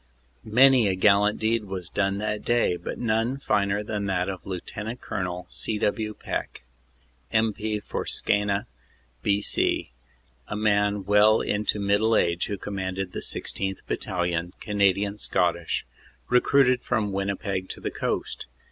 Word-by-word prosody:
Many 125 +1 +5
a 95 - +1
gallant 105 +2 +4
deed 110 0 +1
was 95 -3 -5
done 100 +1 0
that 105 0 -2
day, 120 -6 +2
but - - -6
none 115 +3 0
finer 105 -5 +1
than 105 -1 -3
that 95 -1 0
of 95 -4 -6
Lt. 90 -2 -5 0.3
Col. 90 -1 -4
C. 110 - -2
W. 105 +1 -1
Peck, - - -5 0.7
M.P. 110 -1 0
for - - -4
Skeena, 100 0 +1 0.6
B.C., 100 -10 +1 0.6
a - - -4
man 105 -1 +1
well 105 +2 +5
into 105 0 0
middle 100 +3 +2
age 85 0 +1
who 100 - -3
commanded 95 -1 -4
the - - -4
16th. 95 -1 -3
Battalion, 90 -1 -2
Canadian 100 0 +1
Scottish, 85 -4 0 0.4
recruited 125 0 +4
from 110 -4 0
Winnipeg 100 -1 -2
to - - -6
the - - -3
Coast. - - -3
100 Hz, 135 wpm, -26 LUFS, 95-110 Hz, 0.7 s, Many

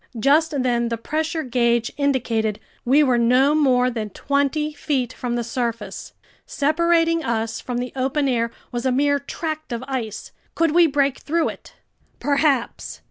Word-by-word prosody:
Just 290 +2 +3
then 240 -2 +1
the 230 - -2
pressure 315 +6 -2
gauge 235 -2 +1
indicated 235 -7 0 0.2
we 275 +5 +4
were 255 -4 +2
no 255 +5 +4
more 255 -4 +3
than 220 -3 -4
twenty 285 +6 -1
feet 270 -4 -2
from 245 -1 -3
the 240 - -1
surface. 235 -3 -4 0.3
Separating 330 +2 +2
us 225 -2 -2
from 245 -1 -4
the 245 0 -4
open 270 +2 0
air 235 -3 +1 0.2
was 240 -1 -3
a - - +2
mere 285 +2 +2
tract 310 +1 -5
of 235 +1 -3
ice. 225 -6 -4 0.2
Could 330 -2 +2
we 340 +1 +5
break 280 -2 +1
through 330 +2 0
it? - - -11 0.4
Perhaps! 280 -4 0
265 Hz, 155 wpm, -22 LUFS, 240-300 Hz, 0.4 s, we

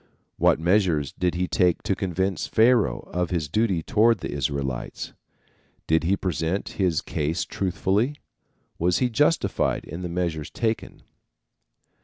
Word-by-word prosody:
What - - +3
measures 85 - +2
did 90 -2 -1
he 90 +1 0
take 90 -1 +2
to - - +1
convince 95 -2 -1
Pharaoh 115 0 +3
of 90 -1 0
his 85 -4 -1
duty 95 -2 +1
toward 115 +4 +3
the - - -5
Israelites? 70 -2 -3 0.7
Did 80 +1 +2
he 95 +3 +2
present 90 +1 -2
his 90 -5 0
case 75 +1 -2
truthfully? 100 - 0 0.6
Was 90 +1 +2
he 125 -1 +1
justified 145 - +1
in 85 +4 -7
the 90 - -4
measures 85 -4 -2
taken? 115 -1 -3
90 Hz, 135 wpm, -25 LUFS, 80-100 Hz, 0.7 s, What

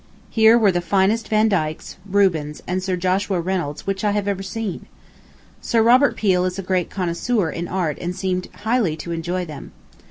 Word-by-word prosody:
Here 225 +1 +6
were 215 -4 +4
the 175 -1 -1
finest 200 +5 +1
Vandykes, 200 -8 0
Rubens, 170 -7 +1
and 185 +1 -2
Sir 185 0 -1
Joshua 185 +1 0
Reynolds 170 -4 -3
which 195 0 -2
I 210 - +3
have 200 -2 -1
seen. 205 0 -5 0.7
Sir 230 -2 +2
Robert 255 +5 +5
Peel 185 -4 +2
is 185 0 -2
a 195 - -4
great 185 -1 0
connoisseur 180 +1 -1
in 170 +1 -4
art 175 -5 -2
and 175 +1 -3
seemed 185 -1 -2
highly 220 -6 0
to 170 - -6
enjoy 175 +2 -2
them. 150 -4 -10
185 Hz, 170 wpm, -21 LUFS, 175-205 Hz, 0.7 s, Here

